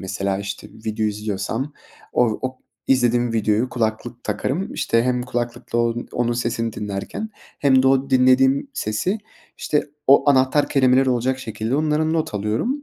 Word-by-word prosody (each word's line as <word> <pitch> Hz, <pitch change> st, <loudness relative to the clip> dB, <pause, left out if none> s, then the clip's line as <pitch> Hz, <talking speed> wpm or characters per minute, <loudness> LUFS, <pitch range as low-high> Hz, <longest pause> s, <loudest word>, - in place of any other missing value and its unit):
mesela? 95 Hz, +1 st, -2 dB
İşte, 100 Hz, 0 st, -6 dB
video 110 Hz, 0 st, -3 dB
izliyorsam 105 Hz, +6 st, -3 dB, 0.4 s
o 115 Hz, -3 st, +2 dB
o 130 Hz, 0 st, -4 dB, 0.3 s
izlediğim 120 Hz, -2 st, +2 dB
videoyu 110 Hz, +2 st, +1 dB
kulaklık 120 Hz, +1 st, -3 dB
takarım, 135 Hz, -, -2 dB
işte, 115 Hz, 0 st, +1 dB
hem 125 Hz, 0 st, 0 dB
kulaklıkla 120 Hz, -1 st, -3 dB
on 120 Hz, 0 st, -1 dB
onun 120 Hz, 0 st, 0 dB
sesini 115 Hz, -1 st, -2 dB
dinlerken 105 Hz, -, -5 dB, 0.3 s
hem 130 Hz, -2 st, +4 dB
de 130 Hz, -, +4 dB
o 135 Hz, +1 st, +2 dB
dinlediğim 130 Hz, -, +4 dB
sesi, 180 Hz, -, -1 dB, 0.4 s
işte, 150 Hz, -, 0 dB, 0.2 s
o 140 Hz, +1 st, +6 dB
anahtar 135 Hz, +2 st, +3 dB
kelimeleri 130 Hz, -1 st, +3 dB
olacak 125 Hz, +2 st, 0 dB
şekilde 115 Hz, +1 st, -3 dB
onları 155 Hz, +1 st, +1 dB
not 160 Hz, -8 st, -1 dB
alıyorum. 110 Hz, -, -1 dB
120 Hz, 145 wpm, -21 LUFS, 110-135 Hz, 0.4 s, o